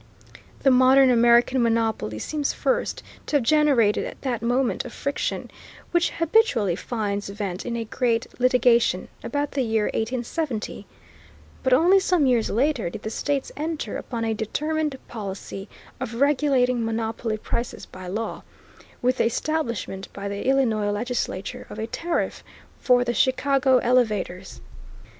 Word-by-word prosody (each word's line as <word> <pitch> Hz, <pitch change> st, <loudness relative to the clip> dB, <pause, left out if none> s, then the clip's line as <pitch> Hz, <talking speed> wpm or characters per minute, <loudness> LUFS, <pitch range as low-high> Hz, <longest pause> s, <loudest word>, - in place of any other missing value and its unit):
The 270 Hz, -, +5 dB
modern 260 Hz, +1 st, +6 dB
American 240 Hz, +2 st, +4 dB
monopoly 225 Hz, -, 0 dB
seems 290 Hz, -, -2 dB
first -, -, -1 dB, 0.2 s
to -, -, -1 dB
have 280 Hz, -, +3 dB
generated 275 Hz, -6 st, +2 dB
that 245 Hz, -5 st, -2 dB
amount 245 Hz, +2 st, +1 dB
of -, -, -8 dB
friction, 280 Hz, 0 st, -3 dB, 0.4 s
which 345 Hz, 0 st, +2 dB
habitually 320 Hz, -, +2 dB
finds 205 Hz, -2 st, -3 dB
vent 200 Hz, 0 st, -4 dB
in 235 Hz, -, -2 dB
a 230 Hz, -1 st, -3 dB
great 230 Hz, 0 st, 0 dB
litigation, 245 Hz, -1 st, +3 dB
about 290 Hz, 0 st, -2 dB
the 275 Hz, -, -1 dB
year 220 Hz, -3 st, 0 dB
1870; 240 Hz, +2 st, -3 dB, 0.7 s
but 260 Hz, -, 0 dB
only 345 Hz, +9 st, +6 dB
some 360 Hz, -5 st, +2 dB
years 245 Hz, -4 st, +2 dB
later 250 Hz, -, +1 dB
did 210 Hz, +4 st, -9 dB
the 220 Hz, -, -4 dB
states 280 Hz, +2 st, -2 dB
enter 315 Hz, +1 st, -3 dB
upon 230 Hz, -2 st, -4 dB
a 225 Hz, -, 0 dB
determined 300 Hz, +7 st, -2 dB
policy 195 Hz, -2 st, -7 dB, 0.3 s
of 230 Hz, -, -4 dB
regulating 260 Hz, -3 st, +2 dB
monopoly 225 Hz, 0 st, -2 dB
prices 235 Hz, +3 st, -4 dB
by 185 Hz, 0 st, -10 dB
law, 215 Hz, +5 st, -4 dB, 0.6 s
with 255 Hz, +1 st, +2 dB
the -, -, +2 dB
establishment 235 Hz, -7 st, -2 dB
by 200 Hz, 0 st, -5 dB
the 200 Hz, +4 st, -4 dB
Illinois 230 Hz, -6 st, +2 dB
legislature 205 Hz, -3 st, -3 dB
of -, -, -9 dB
a 220 Hz, -, -2 dB
tariff 335 Hz, +9 st, -2 dB, 0.4 s
for 250 Hz, -1 st, +4 dB
the 240 Hz, -1 st, -1 dB
Chicago 265 Hz, +1 st, +3 dB
elevators. 215 Hz, -7 st, 0 dB
240 Hz, 140 wpm, -24 LUFS, 220-275 Hz, 0.7 s, modern